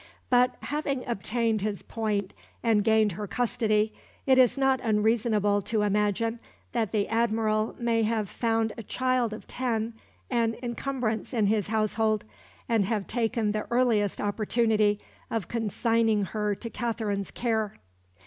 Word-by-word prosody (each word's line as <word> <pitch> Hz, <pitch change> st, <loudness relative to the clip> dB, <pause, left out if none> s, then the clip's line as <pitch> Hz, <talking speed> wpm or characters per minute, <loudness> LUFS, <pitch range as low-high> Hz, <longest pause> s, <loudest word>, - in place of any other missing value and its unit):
But, 250 Hz, 0 st, +4 dB
having 280 Hz, -3 st, -2 dB
obtained 230 Hz, 0 st, 0 dB
his 205 Hz, -1 st, -3 dB
point 210 Hz, -4 st, -2 dB, 0.3 s
and 220 Hz, -3 st, +3 dB
gained 220 Hz, -1 st, +4 dB
her 205 Hz, +4 st, -5 dB
custody, 215 Hz, -1 st, +1 dB, 0.3 s
it 260 Hz, -1 st, +5 dB
is 255 Hz, +1 st, +5 dB
not 270 Hz, -1 st, +2 dB
unreasonable 215 Hz, -2 st, +2 dB
to 210 Hz, +1 st, 0 dB
imagine 210 Hz, +3 st, +1 dB, 0.3 s
that 225 Hz, -5 st, -1 dB
the 210 Hz, -2 st, +1 dB
Admiral 220 Hz, -1 st, +1 dB
may 235 Hz, -1 st, +1 dB
have 220 Hz, -1 st, 0 dB
found 225 Hz, +1 st, 0 dB
a -, -, -6 dB
child 255 Hz, +1 st, 0 dB
of 215 Hz, -, -8 dB
ten 230 Hz, -3 st, -2 dB, 0.4 s
an 230 Hz, -2 st, +1 dB
encumbrance 240 Hz, -1 st, -2 dB
in 220 Hz, -3 st, +3 dB
his 205 Hz, -1 st, +1 dB
household, 215 Hz, 0 st, +1 dB, 0.4 s
and 225 Hz, -4 st, +2 dB
have 210 Hz, -1 st, -1 dB
taken 225 Hz, -2 st, 0 dB
the 215 Hz, 0 st, -3 dB
earliest 235 Hz, -5 st, +2 dB
opportunity 215 Hz, 0 st, +1 dB, 0.3 s
of 225 Hz, -6 st, -2 dB
consigning 225 Hz, -1 st, +1 dB
her 210 Hz, +1 st, -1 dB
to 230 Hz, -, -7 dB
Katherine's 215 Hz, -5 st, -2 dB
care. 220 Hz, -4 st, -1 dB
220 Hz, 140 wpm, -27 LUFS, 210-235 Hz, 0.4 s, it